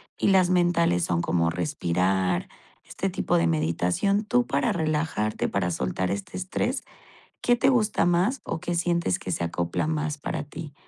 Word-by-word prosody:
y - - 0
las 185 -2 +4
mentales 170 - +2
son 85 -1 0
como 85 -1 +1
respirar, 90 - 0 0.3
este - - -3
tipo - - 0
de 85 0 +2
meditación. 90 - +1
Tú 245 +2 +2
para 235 - +1
relajarte, 155 -9 -1
para 90 -3 0
soltar 90 +4 -1
este 100 - -5
estrés, 185 0 -2 0.6
¿qué 245 - +4
te 265 +3 +3
gusta 220 -5 +2
más 185 +8 +2
o 160 - -4
qué 175 0 -3
sientes 170 - 0
que 90 - -5
se 85 - -1
acopla 85 - -1
más 150 -1 -1
para 145 - -4
ti? 150 0 -9
150 Hz, 165 wpm, -26 LUFS, -, 0.6 s, las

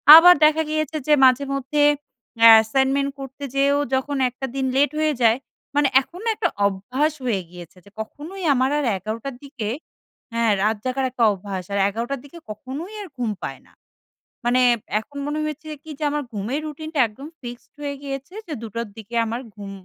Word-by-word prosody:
আবার 355 +2 +10
দেখা 310 +1 +4
গিয়েছে 310 0 -1
যে 300 - +5
মাঝে 260 +2 +4
মধ্যে 275 +2 -1 0.6
অ্যা 230 0 +9
অ্যাসাইনমেন্ট 270 +5 +2
করতে 270 +1 -8
যেয়েও 280 +1 +3 0.2
যখন 275 +2 -1
একটা 255 +2 -6
দিন 270 - 0
লেট 285 +2 +3
হয়ে 310 -1 +2
যায়, 230 0 +5 0.4
মানে 290 -1 +4
এখন 345 +7 -12
না - - +2
একটা - - 0 0.2
অভ্যাস 250 +11 -1
হয়ে 215 -6 0
গিয়েছে 175 0 -12
যে - - -15
কখনোই 320 - -7
আমার 260 0 +2
আর 295 - -1
১১ঃ০০ 220 +7 -5
দিকে 255 -7 -5 0.7
হ্যাঁ, 230 -1 +2
রাত 220 +1 +2
জাগার 260 +1 -1
একটা 240 -2 +1
অভ্যাস 195 -1 -5
আর 200 - 0
১১ঃ০০ 235 +6 -3
দিকে 285 +4 -12
কখনোই 270 - -7
আর 395 - -9
ঘুম 235 -3 -1
পায় - - -5
না। - - -24 0.7
মানে 250 +1 +3 0.4
এখন 285 +6 -12
মনে 295 +1 -2
হয়েছে 305 +1 -6 0.2
কি 320 - -13
যে - - -3
আমার 295 -1 -1
ঘুমের 225 +8 -3
রুটিনটা 310 0 -5
একদম 260 +7 -11
fixed 240 -1 -9
হয়ে 285 -1 -3
গিয়েছে 275 +4 -6
যে 320 - -4
২ঃ০০ 230 +1 -4
দিকে 220 +2 -9
আমার 230 +2 -3
ঘুম 200 -1 -8
265 Hz, 180 wpm, -22 LUFS, 225-290 Hz, 0.7 s, আবার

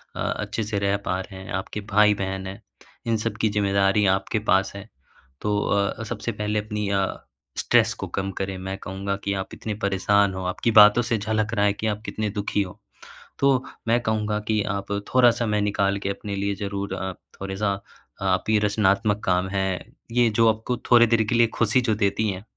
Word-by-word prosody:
अ, - - -7
अच्छे 115 - -2
से 105 -1 -2
रह 100 0 +1
पा 90 - -1
रहे 95 0 -10
हैं। - - -9
आपके 95 +3 -4
भाई-बहन 100 -2 +2
हैं। 95 +1 -8 0.5
इन 115 -1 +2
सब 110 0 -3
की 110 - +3
ज़िम्मेदारी 100 0 +2
आपके 95 +3 -3
पास 95 +1 +3
है। 100 +2 -9 0.5
तो 105 0 0
अ, 100 +2 0
सबसे 115 +1 -4
पहले 105 0 -1
अपनी 105 -1 -3
अ, 95 -1 -1 0.3
स्ट्रेस - - +3
को - - -4
कम 95 0 -3
करें। 95 -1 -3
मैं 95 +1 -5
कहूँगा 95 +1 -4
कि 100 - -1
आप - - -9
इतने 110 - -5
परेशान 100 0 +2
हो। 95 0 -5
आपकी 90 +5 0
बातों 105 +2 +8
से 115 -1 0
झलक 110 +1 -1
रहा 100 -2 +2
है 100 - +3
कि 110 +2 -3
आप 105 0 -2
कितने 110 -1 -2
दुखी 100 0 -1
हो। 90 - -11 0.6
तो 135 -2 +3 0.2
मैं 120 +1 +3
कहूँगा 105 -1 0
कि 110 -1 +2
आप 100 0 -5 0.2
थोड़ा 125 -1 +7
समय 110 -3 0
निकाल 100 -1 +1
के - - +1
अपने 100 0 -4
लिए 100 0 -1
ज़रूर 100 -1 -3
अ, 95 0 -3 0.3
थोड़ा-सा 100 +1 -2 0.5
आप - - +1
ये 110 - +4
रचनात्मक 105 0 +1
काम 90 +1 +1
है। 95 0 0 0.4
ये 120 -1 +4
जो 115 +1 +3
आपको 110 +3 -4
थोड़ी 120 -1 +8
देर 115 -1 +3
के 120 - +1
लिए 115 0 +5
ख़ुशी 115 +3 +2
जो 115 -3 +1
देती 105 +1 +1
हैं। 95 0 -5
105 Hz, 200 wpm, -24 LUFS, 100-110 Hz, 0.6 s, बातों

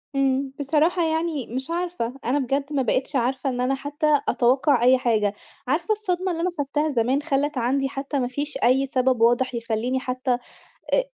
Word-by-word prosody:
إمم، 270 0 +1
بصراحة 310 +5 +2
يعني 320 -4 -1
مش 260 +5 -3
عارفة، 345 -9 -2
أنا 260 +5 +1
بجد 275 +2 -2
ما 280 - +1
بقيتش 260 +3 -1
عارفة 260 +2 0
إن 250 -1 -2
أنا 260 +2 +1
حتى 290 +2 +1
أتوقع 260 +1 +3
أي 255 +1 +6
حاجة، 215 -5 +1 0.3
عارفة 315 +9 0
الصدمة 375 -3 -1
اللي 335 -1 -3
أنا 360 - +1
خدتها 295 +2 0
زمان 260 +1 +1
خلّت 290 -1 -1
عندي 270 +3 0
حتى 275 +1 -3
ما 245 - 0
فيش 290 +4 -3
أي 260 +3 +4
سبب 255 -2 +1
واضح 240 +2 +3
يخلّيني 230 +2 -1
حتى 255 0 -2 0.6
أ - - +4
270 Hz, 175 wpm, -24 LUFS, 250-295 Hz, 0.6 s, أي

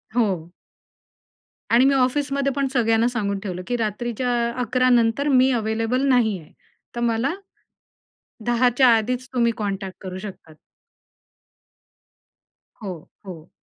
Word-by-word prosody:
हो. 190 -8 0 1.2
आणि 245 +3 +5
मी 275 - +4
ऑफिसमध्ये 275 +1 +1
पण 275 -1 0
सगळ्यांना 225 -1 +2
सांगून 205 -5 -2
ठेवलं 180 -2 -4
की 245 - -1
रात्रीच्या 235 +3 -2 0.3
11:00 255 +2 +1
नंतर 240 +4 +2
मी 260 -1 +4
अवेलेबल 225 +3 0
नाहीये. 220 -10 +1 0.4
तर - - -3
मला. 235 +4 0 1.1
10 240 +1 +3
च्या 260 -1 +6
आधीच 250 +3 -2
तुम्ही 235 -2 +2
कॉन्टॅक्ट 195 -2 -4
करू 185 0 -6
शकतात. 190 -5 -10 2.3
हो, 195 -4 -4 0.3
हो. 170 -3 -10
235 Hz, 115 wpm, -22 LUFS, 205-255 Hz, 2.3 s, च्या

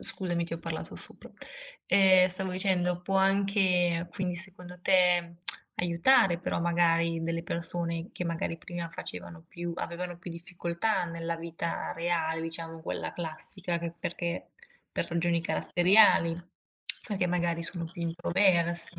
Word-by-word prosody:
Scusami 175 -3 -2
ti 165 - -8
ho 165 - -2
parlato 165 -1 -5
sopra. - - -13 0.6
Ehm, 185 -1 +6
stavo 185 0 -3
dicendo, 180 -2 +1
può 195 +2 0
anche 190 -3 +3
quindi, 180 -3 -2
secondo 180 0 -9
te, 175 -2 +3 0.4
aiutare 175 +2 +4
però 175 - -2
magari 170 -1 +2
delle 165 0 -1
persone 170 -1 -3
che 180 - -4
magari 165 0 -2
prima 170 0 -5
facevano 170 -2 -8
più 175 0 -5
avevano 175 0 -4
più 175 0 -8
difficoltà 175 +4 -1
nella 170 0 -3
vita 165 0 -4
reale, 165 -1 0
diciamo 165 0 -6
quella 160 - -4
classica, 170 +1 -4
che 170 0 -4
perché 170 +1 -3 0.4
per - - -1
ragioni 170 0 +1
caratteriali, 175 +1 +4 0.7
perché 190 -4 0
magari 170 -1 0
sono 170 0 -4
più 170 +1 -7
introvers 170 0 +2
170 Hz, 135 wpm, -29 LUFS, 170-180 Hz, 0.7 s, Ehm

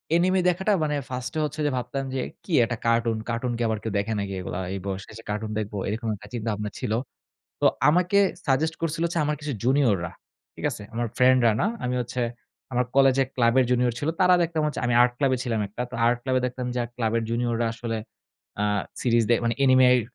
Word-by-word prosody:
anime 185 +2 +3
দেখাটা 190 +4 0
মানে 150 -1 0
1st 125 +4 -4
এ - - +1
হচ্ছে 150 - -6
যে 145 - +2
ভাবতাম 125 +3 -3
যে, 130 - 0 0.2
"কি 175 - -6
একটা 115 0 -2
কার্টুন। 115 -1 +2
কার্টুন 120 +1 -1
কি - - -4
আবার 110 -1 0
কেউ 110 - -3
দেখে 110 +2 -2
নাকি 100 -1 -3
এগুলা? 90 0 -4
এই 100 - -3
বয়সে 95 0 -4
যেয়ে 115 - -13
কার্টুন 105 +1 -3
দেখবো?" 105 -1 -4
এরকম 110 +3 -3
একটা 105 +1 -13
চিন্তাভাবনা 105 -3 -2
ছিল। 125 -5 -3 0.7
তো - - +4 0.2
আমাকে 180 +5 +3 0.3
suggest 155 +4 +2
করছিল 165 0 -1
হচ্ছে 170 0 -2
আমার 150 0 0
কিছু 145 -1 -3
junior 130 -3 +3
রা। - - -9 0.4
ঠিক - - -8
আছে? - - -7
আমার 120 0 -1
ফ্রেন্ডরা 125 -3 +5
না। 195 - +2 0.2
আমি 125 0 -1
হচ্ছে 125 +1 -3 0.5
আমার 125 +1 +2
কলেজে 135 0 +5
ক্লাবের 125 +1 +4
junior 125 -1 +2
ছিল। 145 - -2
তারা 180 0 +6
দেখতাম 160 -2 0
হচ্ছে 150 - -3
আমি 120 - +1
আর্ট 125 0 +3
ক্লাবে 135 -2 +2
ছিলাম 115 -3 -1
একটা। 115 +5 -5
তো - - -9
আর্ট 120 0 +3
ক্লাবে 130 -1 +1
দেখতাম 125 0 -4
যে - - -1
আ - - -5
ক্লাবের 115 -1 0
junior 120 0 0
রা 115 - +2
আসলে 115 -1 -3 0.6
অ্যা 105 +1 0 0.3
সিরিজ 115 -2 +3
দে - - +7
মানে 115 - +1
anime 130 -1 +6
র - - +2
125 Hz, 215 wpm, -25 LUFS, 115-135 Hz, 0.7 s, দে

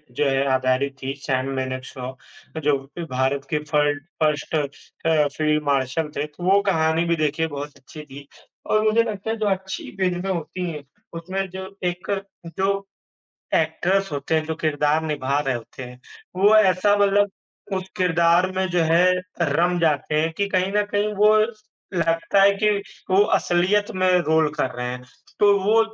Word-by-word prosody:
जो 145 - +1
है 135 0 +1
आधारित 130 +1 +1
थी, 135 +1 -3
सैम 130 -1 -1
मानेकशॉ, 130 -1 -5 0.5
जो 145 -1 +3 0.2
कि 170 - -3
भारत 135 +2 0
के 150 - 0
फ़र्ड 145 -1 +2 0.2
1st 150 +1 0
अ, 150 +1 -1
फ़ील्ड 155 -1 +1
मार्शल 140 +2 0
थे, 145 - 0
तो 150 +4 -12
वो 195 +2 +4
कहानी 160 -2 +2
भी 170 0 +1
देखिए 155 +1 0
बहुत 145 -1 -7
अच्छी 140 +3 -11
थी। 140 0 -12 0.4
और 215 0 +2
मुझे 220 +1 +3
लगता 215 -2 -5
है, 225 - 0
जो 215 - -1
अच्छी 190 -1 -3
फ़िल्में 185 0 -1
होती 175 +1 -4
हैं, 150 -2 -7 0.3
उसमें 185 +4 -3
जो 190 +1 -8
एक 180 +2 -2 0.5
जो 195 +1 0 0.7
एक्टर्स 180 +5 +1
होते 145 +2 -2
हैं, 155 -1 +1
जो 160 0 -3
किरदार 150 0 +1
निभा 145 -3 -1
रहे 135 -3 -1
होते 120 +2 -8
हैं, 125 0 -10 0.4
वो 205 +3 +5
ऐसा 205 0 +4
मतलब 205 0 +3 0.5
उस 185 0 -5
किरदार 175 0 +3
में 190 0 +1
जो 175 0 +1
है 170 +3 +4 0.3
रम 170 +3 +2
जाते 150 -1 +1
हैं 160 +1 -1
कि 200 - 0
कहीं 185 0 0
न 210 0 +3
कहीं 205 +1 0
वो 210 +1 +5 0.6
लगता 165 +4 +2
है 200 - +7
कि 210 - +5 0.4
वो 190 +1 +5 0.2
असलियत 190 +5 +1
में 185 0 +2 0.2
रोल 160 0 +3
कर 130 - +1
रहे 125 0 -3
हैं। 125 0 -6 0.4
तो 205 -1 +6
वो 220 +3 +4
165 Hz, 170 wpm, -23 LUFS, 145-190 Hz, 0.7 s, है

